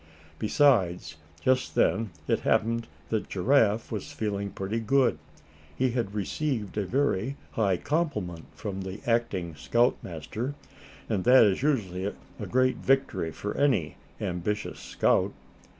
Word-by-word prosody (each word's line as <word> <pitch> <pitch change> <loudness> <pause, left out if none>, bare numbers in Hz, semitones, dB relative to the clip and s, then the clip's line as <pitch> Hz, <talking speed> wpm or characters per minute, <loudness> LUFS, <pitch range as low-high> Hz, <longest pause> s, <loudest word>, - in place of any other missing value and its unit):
Besides, 95 - +2 0.3
just 130 0 +2
then 110 +2 +2 0.2
it - - +2
happened 115 +1 +1 0.2
that 110 -2 -1
Giraffe 110 +1 +2
was 105 -4 -4
feeling 100 -2 -2
pretty 100 +4 -3
good. 130 +3 +2 0.6
He 130 +6 +1
had 115 -4 -2
received 110 0 -2
a 105 -3 -1
very 135 0 0
high 100 -5 +1
compliment 105 - -2
from 100 -3 -5
the 95 +2 -6
acting 115 -8 0
scoutmaster, 110 - -1 0.5
and 100 -4 0
that 125 0 +8
is 100 -1 +2
usually 100 -11 0
a 100 - -7
great 130 0 +2
victory 135 -11 +1
for 105 +5 -5
any 125 - +1 0.2
ambitious 90 +4 -3
scout. - - +1
110 Hz, 125 wpm, -28 LUFS, 95-130 Hz, 0.6 s, that